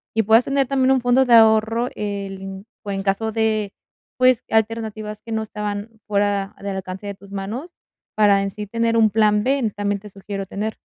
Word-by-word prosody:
y 225 - +3
puedas 225 +4 +5
tener 275 -1 +1
también 265 -1 +2
un 265 -1 +3
fondo 245 +2 +3
de 245 - +3
ahorro, 225 +1 +5
el 200 -2 -4
m 195 0 -7 0.2
por 200 - -4
en 195 0 -3
caso 200 +3 0
de 215 -2 0 0.4
pues 255 -2 +4
alternativas 220 -1 -1
que 225 - -10
no 220 0 0
estaban 210 +1 -5
fuera 200 -1 0
del 200 -1 -4
alcance 190 +2 -6
de 200 - -5
tus 200 0 -16
manos, 220 - -5 0.4
para 205 -2 +4
en 195 - -3
sí 210 +1 -7
tener 230 +2 0
un 220 -1 +5
plan 210 -1 +3
B, 260 -3 +1
también 205 -1 -1
te 210 - -12
sugiero 195 0 -6
tener. 210 +3 -4
215 Hz, 200 wpm, -21 LUFS, 200-225 Hz, 0.4 s, puedas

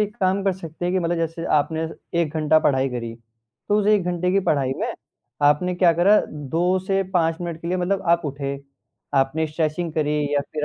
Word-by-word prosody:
एक 210 0 -1
काम 190 +1 +2
कर 195 - +3
सकते 175 -2 -8
हैं 180 - 0
कि 185 - +3
मतलब 170 0 0
जैसे 165 0 -3
आपने 160 +2 0 0.3
1 160 -1 -2
घंटा 155 0 +4
पढ़ाई 135 -3 +2
करी, 120 -2 -5 0.5
तो 205 - +3
उस 205 - -2
1 210 -3 +4
घंटे 180 0 0
की 195 - +3
पढ़ाई 135 -3 +1
में - - -2 0.6
आपने 180 +5 +1
क्या 175 -1 +4
करा 185 +6 +5 0.3
2 180 +3 +2
से 195 0 +1
5 165 -2 +2
मिनट 170 -2 -5
के 170 - -5
लिए 180 - 0
मतलब 190 +2 -1
आप 170 - -5
उठे। 140 -1 -3 0.6
आपने 135 +4 +1
स्ट्रेचिंग 155 +2 -2
करी 150 -1 0 0.2
या 145 - +3
फिर 150 -1 -2
165 Hz, 210 wpm, -22 LUFS, 150-180 Hz, 0.6 s, करा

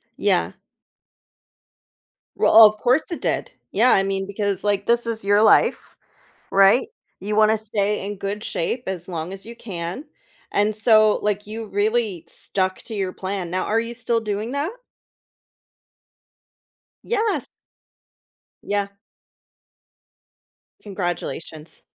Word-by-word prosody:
Yeah. - - +1 1.8
Well, 220 0 +8
of 215 0 +3
course 255 +7 +1
it 340 - -4
did. - - -2 0.2
Yeah. 235 +5 +4
I 195 - +4
mean, 195 0 -2
because, 200 -1 -2
like, 205 -1 0
this 235 0 +3
is 225 -2 -1
your 205 +1 +4
life, - - +3 0.6
right? 195 - +5 0.3
You 210 +2 -2
wanna 215 0 +4
stay 210 -2 -1
in 205 0 -5
good 200 +2 -4
shape 235 +6 -3
as 185 -3 -4
long 170 0 -5
as 195 - -10
you 235 - -9
can. 185 - -6 0.5
And 210 +1 +1
so, 215 -1 +5
like, 210 0 -1
you 220 +1 -6
really 205 -3 0
stuck 185 -1 -1
to 225 - -8
your 190 -3 -2
plan. 190 -2 -4
Now, 185 +1 -1
are 220 - +1
you 230 +1 -5
still 235 -1 -1
doing 215 +2 -3
that? 285 +5 -1 2.3
Yes. 445 -2 -1 1.2
Yeah. 205 -1 -1 1.9
Congratulations. 175 -5 -5
205 Hz, 125 wpm, -22 LUFS, 195-225 Hz, 2.3 s, Well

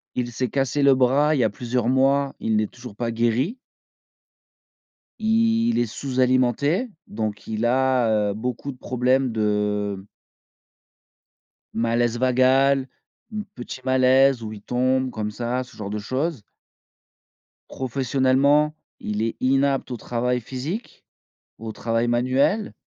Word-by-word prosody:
Il 120 -1 -2
s'est 125 0 -2
cassé 140 +2 0
le 140 -1 +6
bras 135 +4 +3
il - - 0
y 120 - +3
a 110 - +3
plusieurs 120 +2 -2
mois, 135 +1 +2
il 110 -1 0
n'est 105 -1 +1
toujours 120 -4 -12
pas 120 0 -2
guéri. 120 - 0 1.6
Il 230 +1 +2
est 120 - +2
sous-alimenté. 130 - +1 0.2
Donc 105 -1 -4
il 110 +1 -2
a, 120 -4 +2
heu, - - -3
beaucoup 125 +5 -4
de 125 - -14
problèmes 125 +1 +1
de 105 -2 -1 1.7
malaise 115 +1 +1
vagal. 130 +2 +3 0.5
Mmh, 210 -1 -4
petit 125 +1 -8
malaise 130 -1 +4
où 110 - -5
il 105 - -10
tombe 130 +2 0
comme 105 -1 -4
ça, 120 +3 -2
ce 125 - -17
genre 100 -2 -5
de 105 +1 -3
choses. 130 +3 -2 1.3
Professionnellement, 135 +3 +2 0.2
il 105 +1 -3
est 115 0 -1
inapte 135 0 +1
au 120 - -3
travail 125 +1 -1
physique, 140 - -6 0.5
au 110 0 -6
travail 115 +2 -1
manuel. 130 - +1
125 Hz, 130 wpm, -23 LUFS, 115-135 Hz, 1.7 s, le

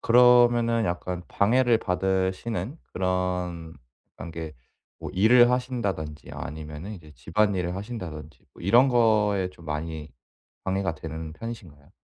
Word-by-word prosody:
그러면은 120 -1 +5
약간 90 0 -3
방해를 120 +2 +3
받으시는 95 - -1
그런 90 -3 -2 0.4
그런 85 - -7
게 80 -2 -7 0.4
뭐 - - -6
일을 120 +5 +6
하신다든지 110 - -2
아니면은 75 +6 -7
이제 80 -5 -13
집안일을 90 -1 0
하신다든지 85 - -7
뭐 - - -14
이런 120 +8 +5
거에 105 -6 +3
좀 85 -3 -16
많이 75 0 -4 0.5
방해가 95 -3 -1
되는 80 0 -7
편이신가요? 90 -11 -9
95 Hz, 295 characters per minute, -26 LUFS, 80-115 Hz, 0.5 s, 일을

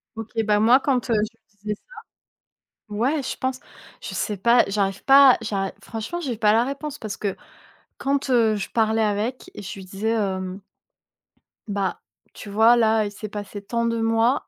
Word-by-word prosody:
OK. 225 -1 -7
Bah, 210 -1 +2
moi, 235 +5 +6
quand, 260 -3 0
heu, - - +3
je 215 +1 -1
lui - - -49 0.3
disais - - -7
ça - - -22 1.0
ouais, 270 +8 0
je - - -4
pense. 260 0 -2 0.4
Je - - -6
sais 210 - -2
pas, 235 +5 +4
j'arrive 195 -1 -1
pas 275 -1 +8
à - - -5
j'arri 195 -3 -2
enfin - - -19
franchement, 225 +10 -4
j'ai 265 -8 -3
pas 210 -1 +3
la 230 +2 +3
réponse, 280 +2 -5
parce 215 -3 -5
que, 200 -2 -3 0.6
quand, 275 0 -1
heu, 225 -4 +3
je 200 - -4
parlais 220 -1 +2
avec, 215 +4 -2
je 195 -2 -7
lui 190 - -9
disais, 195 +4 -3
hem 190 -3 -2 1.1
«Bah, 200 -2 -2 0.3
tu 205 - -10
vois, 225 +4 +5
là, 220 -1 +3
il 205 - -4
s'est 215 +1 -7
passé 205 0 -7
tant 235 +3 -2
de 230 0 0
mois, 225 +3 +1
220 Hz, 190 wpm, -23 LUFS, 205-240 Hz, 1.1 s, pas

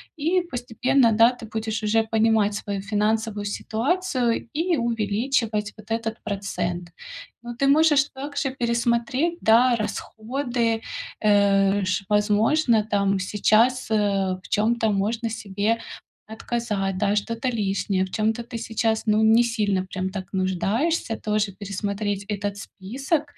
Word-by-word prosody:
И 335 +4 +1
постепенно, 255 -4 +1
да, 225 +2 +5
ты 245 -2 -10
будешь 220 0 -3
уже 225 +1 +2
понимать 220 -1 +2
свою 200 -1 -4
финансовую 210 +1 -1
ситуацию 245 - -1
и 335 +2 +1
увеличивать 225 -1 -1
вот 215 +1 -15
этот 225 0 -2
процент. 180 -4 -3 0.5
Но 240 0 -7
ты 275 +3 +1
можешь 295 0 +5
также 280 0 -3
пересмотреть, 240 +6 0
да, 240 +3 +5
расходы, 230 +2 -2 0.4
э, 200 -1 +3
ш 185 +2 -1
возможно, 215 +4 +3
там 200 -2 +1
сейчас, 220 +6 +2
э, 220 - +2 0.5
в - - -14
чём-то 220 +1 +1
можно 220 +4 -1
себе 215 0 -1 0.5
отказать, 215 -4 -3
да, 205 0 +1
что-то 230 +4 -2
лишнее, 200 -4 0
в 185 - -12
чём-то 220 +2 0
ты 235 0 -7
сейчас, 225 0 -1
ну, 215 +1 +3
не 225 +2 +6
сильно 210 -5 0
прям 185 0 -4
так 190 -1 -7
нуждаешься. 210 - 0
Тоже 210 -2 -1
пересмотреть 200 +1 -3
этот 205 -1 -3
список. 265 - -3
220 Hz, 130 wpm, -24 LUFS, 205-240 Hz, 0.5 s, не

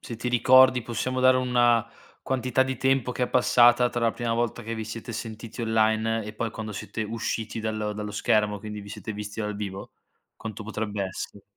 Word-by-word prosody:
se 115 - -7
ti 120 +2 -3
ricordi, 130 +1 +6
possiamo 130 +3 -2
dare 130 0 +6
una 120 -2 +3 0.4
quantità 130 0 +1
di 130 -1 -3
tempo 135 -1 +1
che 125 - -3
è 125 - +1
passata 120 -1 +5
tra 120 - -3
la 115 -1 +3
prima 115 0 -2
volta 120 0 -1
che 115 +1 -4
vi 110 - -4
siete 115 +2 -7
sentiti 115 +1 -7
online, 110 0 +1
e 105 - -7
poi 115 +1 -2
quando 110 0 -6
siete 110 +2 -5
usciti 115 0 -3
dallo 110 -1 -2
dallo 105 0 -5
schermo, 105 0 +1
quindi 105 0 -7
vi 100 - -11
siete 110 +2 -6
visti 105 +1 -6
dal 105 -1 -2
vivo? 100 -2 -6 0.4
Quanto 110 -1 -7
potrebbe 105 -2 -3
essere? 95 +1 -7
115 Hz, 195 wpm, -26 LUFS, 105-120 Hz, 0.4 s, ricordi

